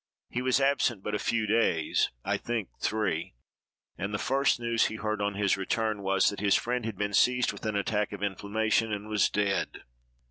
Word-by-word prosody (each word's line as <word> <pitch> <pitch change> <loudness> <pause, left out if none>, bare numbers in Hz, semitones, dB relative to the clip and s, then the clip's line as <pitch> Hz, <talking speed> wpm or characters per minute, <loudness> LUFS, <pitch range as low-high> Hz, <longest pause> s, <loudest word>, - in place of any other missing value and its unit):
He 125 - -2
was 130 +1 +2
absent 135 -7 +1
but 105 - -3
a 105 - 0
few 110 -2 0
days 105 -7 +2 0.2
(I - - +1
think 115 -4 -3
three); 95 - -1 0.6
and 95 +3 -2
the 105 - -1
first 135 +3 +1
news 115 -1 +2
he 110 - -6
heard 105 -1 -2
on 100 0 -1
his 100 -1 +2
return 110 +2 -1
was, 95 0 +3
that 100 - -7
his 100 -1 +3
friend 125 -1 -1
had 110 -4 -4
been 100 0 -2
seized 125 +4 +3
with - - -6
an 110 - -1
attack 105 +1 0
of 100 -1 -6
inflammation, 110 +3 0
and 105 0 -4
was 105 -1 +2
dead. 95 -5 -1
105 Hz, 200 wpm, -29 LUFS, 100-115 Hz, 0.6 s, was